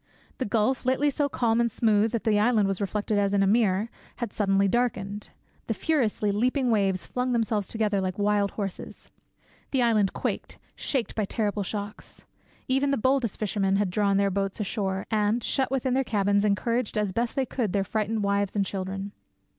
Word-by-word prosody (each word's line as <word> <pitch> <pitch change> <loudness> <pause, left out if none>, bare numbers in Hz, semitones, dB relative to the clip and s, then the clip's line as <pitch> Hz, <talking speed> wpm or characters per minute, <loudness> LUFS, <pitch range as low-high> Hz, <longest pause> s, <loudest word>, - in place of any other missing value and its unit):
The 260 - 0
gulf, 220 +5 +1
lately 265 +3 +2
so 285 +1 0
calm 235 -3 +1
and 235 - +2
smooth 215 -1 +2
that 230 - -1
the 215 -2 +3
island 215 -2 +3
was 195 0 -2
reflected 205 +1 -1
as 200 0 +1
in 195 - +3
a - - +3
mirror, 205 -1 +2 0.3
had 235 -4 -5
suddenly 195 -1 +2
darkened; 205 -3 -1 0.4
the - - -1
furiously 230 -9 +1
leaping 250 +4 +1
waves 195 -4 +1
flung 250 0 -2
themselves 220 -3 0
together 210 -3 0
like 185 0 -3
wild 205 -1 +2
horses; 195 -3 -6 0.6
the 265 -3 +1
island 215 -5 +3
quaked, - - -4 0.2
shaken 260 -5 -2
by 215 - 0
terrible 210 0 -1
shocks. 205 +2 -6 0.4
Even 270 +2 +2
the 275 - +1
boldest 260 -2 +1
fishermen 195 -2 0
had 200 -2 +1
drawn 200 0 +2
their 200 0 +2
boats 195 +1 -2
ashore, 195 -2 -2
and, 215 +2 +1
shut 265 -2 0
within 260 -1 0
their 270 +1 +2
cabins, 205 -3 +1
encouraged 230 +3 0
as 210 -3 0
best 235 +3 -1
they 270 - +1
could 235 -6 -2
their 195 +1 +1
frightened 215 +1 -1
wives 200 0 0
and 200 -1 +2
children. 195 +1 -4
210 Hz, 185 wpm, -26 LUFS, 200-235 Hz, 0.6 s, the